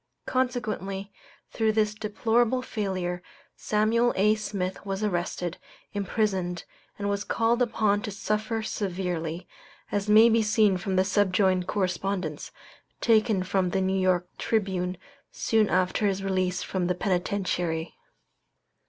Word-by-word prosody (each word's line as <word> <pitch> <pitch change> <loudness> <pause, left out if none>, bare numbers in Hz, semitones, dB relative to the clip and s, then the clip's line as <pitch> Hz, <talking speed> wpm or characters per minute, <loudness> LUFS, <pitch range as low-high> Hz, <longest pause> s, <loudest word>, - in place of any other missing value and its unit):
Consequently, 215 -6 -2 0.4
through 220 -1 +1
this 215 -1 +2
deplorable 225 +3 +1
failure, 185 -6 -3 0.3
Samuel 225 +3 +2
A. 210 +3 +4
Smith 200 -3 -3
was 195 0 -3
arrested, 175 -2 -2 0.3
imprisoned, 195 -4 -1 0.3
and 200 - -3
was 200 0 -1
called 230 +3 +1
upon 215 -4 +2
to 220 - -4
suffer 215 +2 -2
severely, 180 -5 -3 0.4
as 205 +1 -1
may 220 +2 +8
be 230 0 +4
seen 215 -2 +3
from 190 +1 -2
the 185 0 +3
subjoined 190 -2 +2
correspondence, 185 -4 -2 0.5
taken 220 -4 +3
from 185 -1 0
the 190 +2 0
New 190 0 +1
York 180 -1 +2
Tribune 190 -4 -1 0.3
soon 220 -2 +1
after 185 +3 +2
his 195 0 -1
release 185 -1 0
from 185 -2 -2
the 180 - 0
penitentiary. 180 -3 -1
200 Hz, 125 wpm, -27 LUFS, 185-215 Hz, 0.5 s, may